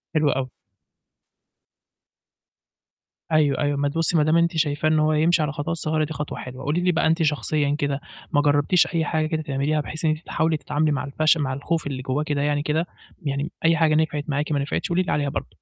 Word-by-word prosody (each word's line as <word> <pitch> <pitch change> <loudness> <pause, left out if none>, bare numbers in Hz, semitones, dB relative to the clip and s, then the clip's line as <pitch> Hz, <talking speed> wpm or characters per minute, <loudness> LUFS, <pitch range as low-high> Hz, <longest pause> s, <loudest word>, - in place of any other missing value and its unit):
حلو 150 -2 +3
أوي. 130 0 -2 2.8
أيوه، 150 -3 +3
أيوه. 145 -1 0
ما 145 0 +1
تبُصّي 165 +2 +1
ما 150 - +4
دام 155 +2 +3
أنتِ 170 -1 +1
شايفاه 150 0 +1
إن 155 -1 +3
هو 155 0 +2
يمشي 160 +2 +3
على 150 0 0
خطوات 155 +3 -3
صغيرة، 155 -1 0
دي 155 - -6
خطوة 150 -1 -5
حلوة. 130 +1 -8
قولي 155 +5 0
لي 180 - +3
بقى 160 -1 +1
أنتِ 165 +1 +2
شخصيًا 150 -1 0
كده، 140 0 -1 0.3
ما 145 - +3
جرّبتيش 145 +4 +3
أي 165 -2 -1
حاجة 155 +1 0
كده 155 0 -2
تعمليها 145 +1 -1
بحيث 155 +2 -5
إن 155 - +4
أنتِ 155 - -2
تحاولي 160 -1 0
تتعاملي 150 +1 0
مع 145 - -1
الفش 155 +3 +2
مع 135 -3 -1
الخوف 155 +3 -2
اللي 130 -2 -4
جوّاكِ 135 +4 -2
كده 145 -2 -1
يعني 145 0 0
كده، 155 +3 0 0.4
يعني 140 +3 -2
أي 165 0 +4
حاجة 155 -2 +3
نفعت 155 -2 0
معاكِ 145 +2 -1
ما 145 - +1
نفعتش، 140 +6 -2
قولي 175 +1 +2
لي - - -3
عليها 145 -1 0
برضه؟ - - -4
150 Hz, 215 wpm, -23 LUFS, 145-160 Hz, 2.8 s, ما